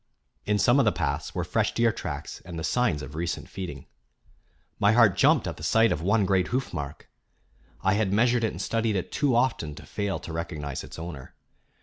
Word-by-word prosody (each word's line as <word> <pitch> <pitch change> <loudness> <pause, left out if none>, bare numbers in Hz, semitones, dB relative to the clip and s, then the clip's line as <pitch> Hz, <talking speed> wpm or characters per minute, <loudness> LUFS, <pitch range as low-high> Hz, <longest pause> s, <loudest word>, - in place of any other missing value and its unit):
In 105 0 +2
some 120 +6 +4
of 135 - +4
the 105 - +4
paths 75 -6 -2
were - - 0
fresh - - 0
deer 115 -1 +3
tracks - - -6
and 85 -2 -8
the 80 - -4
signs 110 -12 +1
of 70 +2 -8
recent 85 +2 -3
feeding. 75 -9 -7 0.9
My 105 +1 +4
heart 110 -5 +5
jumped 140 - +4
at 80 -3 -5
sight 115 +8 +4
of 75 - -1
one 100 +3 +2
great 95 -2 +2
hoof 130 +1 -2
mark. 75 -2 -6 0.8
I 95 - +3
had 105 -2 +1
measured 120 +3 +3
and 105 -6 -1
studied 115 +1 0
it 95 - -3
too 140 -5 +1
often 115 - +1
to - - -11
fail 100 -2 -2
to 85 - -8
recognize 75 -4 -4
its - - -10
owner. 80 -5 -8
95 Hz, 200 wpm, -27 LUFS, 80-115 Hz, 0.9 s, heart